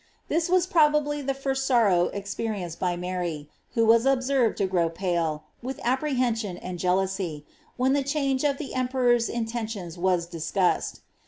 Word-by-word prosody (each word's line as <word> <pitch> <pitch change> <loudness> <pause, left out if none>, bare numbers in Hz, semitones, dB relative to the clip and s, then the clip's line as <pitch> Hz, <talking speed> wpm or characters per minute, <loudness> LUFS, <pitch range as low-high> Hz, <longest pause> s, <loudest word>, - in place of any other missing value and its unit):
This 330 +2 +1
was 365 -1 +4
probably 300 -4 +3
the 275 0 -2
first 270 0 -1
sorrow 205 -9 +4
experienced 200 -3 -4
by 180 -1 0
Mary, 175 -4 -3 0.3
who 230 - +3
WM 230 +3 +5
observed 255 -3 +1
to 200 - +1
grow 175 -3 +1
pale, 165 -3 -1 0.2
with 260 +2 -5
apprehension 245 -7 0
and 180 -1 -6
jealousy, 185 -4 -1 0.3
when 260 +1 +2
the 285 -1 +2
phange 275 -1 0
of 285 -2 +1
the 280 - -6
emperor's 250 -2 +2
intentions 220 -7 -4
was 180 -1 +2
discussed. 175 +2 -1
225 Hz, 150 wpm, -26 LUFS, 180-270 Hz, 0.3 s, WM